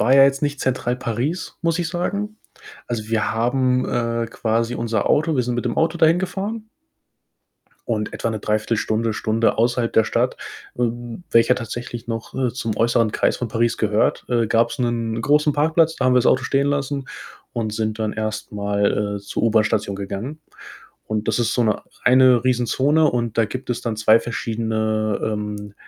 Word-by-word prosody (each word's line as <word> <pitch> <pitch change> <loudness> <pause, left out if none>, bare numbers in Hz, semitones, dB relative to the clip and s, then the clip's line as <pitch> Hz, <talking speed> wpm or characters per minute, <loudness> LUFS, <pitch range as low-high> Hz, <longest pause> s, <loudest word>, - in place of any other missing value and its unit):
war 125 +5 +4
ja 135 - +8
jetzt 140 +1 +1
nicht 145 -1 -1
Zentral 125 -1 -1
Paris, 130 +8 -3
muss 165 +1 +1
ich 170 - -1
sagen. 200 +5 -3 0.5
Also, 110 -3 -4
wir 110 -1 0
haben, 125 +2 +1
äh, 115 -1 -1
quasi 115 +1 -1
unser 115 -3 -1
Auto 155 +1 +2
wir 125 - +2
sind 120 0 -2
mit 120 - -2
dem 120 - -2
Auto 165 +1 +1
dahin 165 +1 +5
gefahren 200 +4 -4 1.2
und 105 -2 -2
etwa 115 - -2
'ne 110 - -3
3/4 110 +2 0
Stunde, 110 +1 0
Stunde 110 +1 0
außerhalb 120 0 +1
der 110 - +4
Stadt, - - 0 0.4
w 120 -1 -3
welcher 115 +2 +5
tatsächlich 120 0 -6
noch, 115 -1 -4
äh, 130 -3 0
zum 115 -4 -3
äußeren 115 -1 +2
Kreis - - +1
von 120 - -3
Paris 115 +1 0
gehört, 105 0 +1
äh, 120 -2 +1
gab's 115 +4 +1
'nen 115 -2 -1
großen 150 +3 +3
Parkplatz, 160 +2 +2
da 130 - -2
haben 130 - +4
wir - - +6
das 125 - +2
Auto 130 - +3
stehen 140 +1 +1
lassen 140 -1 -2 0.5
und 110 -2 -2
sind 110 0 -2
dann 110 -1 -1
erst 110 0 -4
mal, 100 0 0
äh, 100 - -7
zur 100 - -4
U-Bahn-Station 105 -2 +1
gegangen 100 +10 -5 0.7
und 110 0 -2
das 110 - +1
ist 115 -1 0
so 120 - +2
'ne 110 - 0 0.2
eine 125 -1 +5
Riesenzone 130 +5 +2
und 120 -2 -2
da 115 - +5
gibt 130 +4 -7
es 120 - -1
dann 115 -2 -2
2 110 +1 +5
verschiedene, 110 -2 -1
ähm, 105 -1 -4
115 Hz, 185 wpm, -21 LUFS, 110-130 Hz, 1.2 s, ja